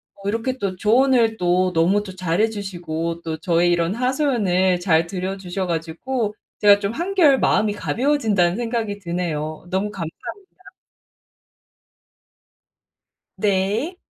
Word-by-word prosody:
어 200 0 -9
이렇게 230 +5 -1
또 195 -4 -3
조언을 230 +2 +3
또 180 +1 +1
너무 175 +5 +3
또 190 -2 -9
잘해 185 +4 +1
주시고 170 -5 -4
또 160 -1 -4
저의 170 +1 +2
이런 170 +2 +1
하소연을 235 - +1
잘 165 -2 +2
들어주셔 185 0 -4
가지고 190 +8 -2 0.3
제가 205 -1 +6
좀 200 0 -2
'한결 335 -2 +3
마음이 210 -1 +2
가벼워진다.'는 220 -8 +1
생각이 225 -4 -2
드네요. 165 -3 -4
너무 195 +2 -1
감사합니다. 370 - -9 2.7
네. 210 - 0
195 Hz, 265 characters per minute, -21 LUFS, 175-230 Hz, 2.7 s, 제가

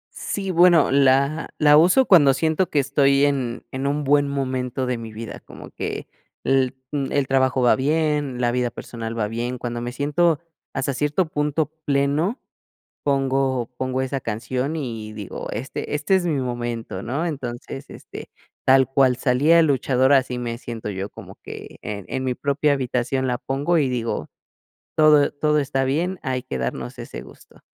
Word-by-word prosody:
Sí, 195 -2 -3
bueno, 175 -4 +5
la 140 +3 +3
la 150 -1 +6
uso 180 +12 +5
cuando 145 - +6
siento 160 +6 0
que 150 - +1
estoy 140 0 +3
en 130 -4 0
en 135 +1 -2
un 145 +1 0
buen 145 +1 +3
momento 130 -2 -2
de 125 -1 -1
mi 115 -1 -8
vida, 110 0 -7
como - - -13
que - - -5 0.4
el, 130 -1 +2 0.2
mm, 140 -3 -2
el 140 -2 +1
trabajo 130 -1 +2
va 120 - +4
bien, 145 -2 0
la 120 -1 +2
vida 125 -1 0
personal 115 -1 -6
va 105 -2 -1
bien. 120 +3 -3
Cuando 120 0 -4
me 120 +1 -4
siento 150 +4 +1 0.3
hasta 135 +1 -1
cierto 150 +6 0
punto 150 0 0 0.2
pleno, 145 - +1 0.6
pongo 135 -3 +1
pongo 130 0 -1
esa 130 +1 -2
canción 125 +7 -3
y 115 -7 -5
digo: 105 -3 -6
"Este 130 +6 -5
este 150 +6 +1
es 180 -2 0
mi 150 -5 0
momento", 120 -5 -4
¿no? 140 +10 -2
Entonces, 135 -2 -5
este, - - -10 0.4
tal 130 0 +6
cual 135 -2 +3
salía 135 +6 +3
el 165 - +5
luchador, 130 -1 +2
así 130 -2 +3
me 120 -1 -4
siento 115 -3 -6
yo, 95 0 -4
como - - -12
que - - -9
en 100 -2 -6
en 130 - -3
mi 125 -1 0
propia 145 +2 +1
habitación 130 0 -1
la 125 -1 -1
pongo 145 +8 0
y 140 -4 +2
digo: 120 -2 -2 0.7
"Todo 150 -2 +5
todo 150 +1 +1
está 135 -2 0
bien", 170 +8 -1
hay 130 -3 -2
que 70 - -5
darnos 65 0 -4
ese - - -7
gusto. - - -16
135 Hz, 175 wpm, -22 LUFS, 125-145 Hz, 0.7 s, la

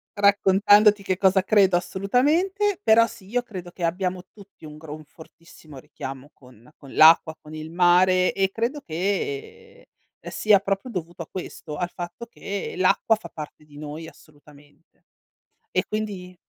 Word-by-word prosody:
raccontandoti 205 +1 +4
che 185 -1 -1
cosa 190 -1 +3
credo 190 -3 +4
assolutamente, 315 - 0
però 230 +1 +5
sì, 200 -5 -14
io 245 +2 0
credo 185 -7 -9
che 175 - -9
abbiamo 180 +1 -2
tutti 200 -5 -16
un 150 0 -10
gro 155 -1 -9
un 155 -1 -13
fortissimo 160 -2 -16
richiamo 135 +2 -9
con 125 -2 -19
con 140 -2 -14
l'acqua, 160 0 +6
con 155 +1 -13
il 155 +1 -8
mare, 180 +1 +3
e 195 -1 0
credo 240 +7 -3
che 425 - -4 0.4
sia 210 -2 +3
proprio 195 +4 -3
dovuto 175 -5 -6
a - - -17
questo, 160 -4 -7
al 175 - -2
fatto 175 +7 -8
che 200 -3 -6
l'acqua 185 +4 +3
fa 215 - -11
parte 150 0 -10
di 145 -1 -17
noi 155 +2 -8
assolutamente. 145 0 -22 0.7
E - - +1
quindi 200 -4 -5
185 Hz, 155 wpm, -24 LUFS, 160-210 Hz, 0.7 s, l'acqua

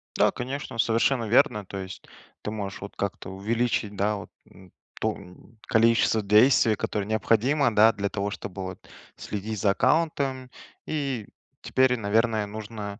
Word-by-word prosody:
Да, - - +4
конечно, 130 0 -5
совершенно 115 +2 +2
верно. 105 -2 +3
То 100 - -7
есть 95 0 -7 0.4
ты 105 - -4
можешь 100 -3 -5
вот 100 - -8
как-то 100 -1 -4
увеличить, 105 +2 -1
да, 105 +2 0
вот 100 - -8 0.2
н 95 -1 -17 0.3
то 110 0 0
н 100 +4 -16
количество 115 -1 +3
действий, 110 +2 +5
которое 105 0 -3
необходимо, 115 +5 +2
да, 110 +2 +7
для 100 0 -2
того, 100 0 -3
чтобы 95 -1 -6
вот 95 0 -8 0.3
следить 105 +1 -5
за 100 - +4
аккаунтом. 135 -1 0 0.4
И 135 -8 -2 0.3
теперь, 130 -1 +2
наверное, 110 0 +1
нужно 105 0 -7
110 Hz, 150 wpm, -26 LUFS, 100-120 Hz, 0.4 s, да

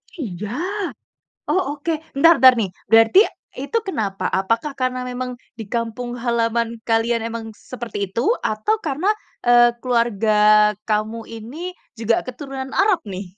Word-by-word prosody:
Iga. 210 - -5 1.0
Oh 375 - +3 0.2
oke, 310 +4 -2 0.3
bentar 330 +3 +6
bentar 260 -1 +9
nih, 205 -4 0 0.2
berarti 225 - +6 0.4
itu 285 +12 -1
kenapa, 205 - -2
apakah 230 +9 0
karena 255 -1 -2
memang 250 0 -5 0.2
di 225 - -6
kampung 240 +1 -3
halaman 235 -1 -1
kalian 230 +1 +2
emang 230 -1 -5
seperti 215 -5 -6
itu? 230 +4 -2 0.2
Atau 220 - 0
karena, 310 +5 -2 0.4
eee, 240 0 +6
keluarga 235 -4 +1 0.6
kamu 215 +2 0
ini 240 +11 -7 0.3
juga 230 0 +2
keturunan 265 +1 -7
Arab 390 -2 +3
nih? 190 0 -5
235 Hz, 130 wpm, -21 LUFS, 225-260 Hz, 1.0 s, bentar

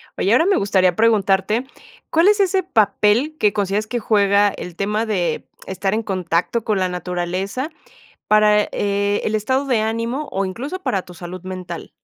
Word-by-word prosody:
Oye, 195 - 0
ahora 255 +9 +4
me 395 - +3
gustaría 190 -3 +2
preguntarte, 215 +1 +2 0.4
¿cuál 330 +3 +3
es 415 0 +4
ese 380 -1 +2
papel 225 - +2
que 210 -1 +3
consideras 205 +1 -1
que 240 +2 -2
juega 205 -2 +3
el 180 -3 -8
tema 210 +4 -1
de 195 -6 -2 0.2
estar 190 +1 -2
en 225 +1 -1
contacto 185 +3 -1
con 215 -3 0
la 185 - +1
naturaleza 180 - -3 0.6
para, 210 0 +5
eh, 200 0 0
el 215 - -1
estado 260 +6 0
de 245 -5 +2
ánimo, 230 +6 -2
o 195 - -1
incluso 270 - -5
para 195 - -1
tu 180 - -14
salud 175 +1 -8
mental? 185 -2 -7
210 Hz, 170 wpm, -20 LUFS, 190-230 Hz, 0.6 s, para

